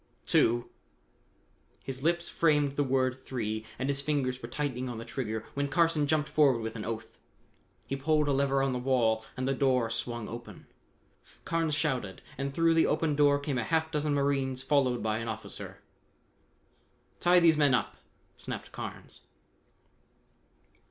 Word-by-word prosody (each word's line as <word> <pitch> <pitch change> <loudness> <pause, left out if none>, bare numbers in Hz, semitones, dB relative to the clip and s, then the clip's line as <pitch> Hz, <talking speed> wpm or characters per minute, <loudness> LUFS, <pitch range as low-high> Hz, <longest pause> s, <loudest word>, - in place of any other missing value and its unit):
Two!" 120 +1 +2 1.1
His 130 -1 -5
lips 170 +3 +1
framed 150 -4 +2
the 145 +1 0
word 130 -1 +1
"three" 110 -4 -4
and 130 - -2
his 140 0 0
fingers 135 -3 -1
were - - -7
tightening 130 -4 -3
on 120 - -5
the 115 - -7
trigger 110 -4 -4
when 140 0 -1
Carson 155 0 +2
jumped 150 0 +1
forward 140 -6 +3
with 110 0 -5
an 110 - -5
oath. 110 0 -6 0.7
He 135 - -3
pulled 150 +2 +1
a - - +2
lever 135 0 +2
on 135 -1 +1
the 125 - -2
wall 120 -4 +2
and 130 0 -1
the 135 - +2
door 130 -4 +2
swung 120 -1 -3
open. 120 +1 -9 0.8
Carnes 165 -2 0
shouted 125 -11 -2
and 140 +1 -3
through 165 +3 +3
the 165 - +4
opened 155 -1 +1
door 145 -1 +5
came 140 -2 -2
a - - -1
half 160 +5 0
dozen 150 -1 0
marines 135 -2 0
followed 135 -4 +2
by 110 0 0
an 115 - -5
officer. 110 -1 -7 1.4
"Tie 180 +1 +5
these 165 -2 +5
men 145 -4 +4
up!" - - -2 0.4
snapped - - -6
Carnes. - - -8
135 Hz, 160 wpm, -30 LUFS, 120-150 Hz, 1.4 s, door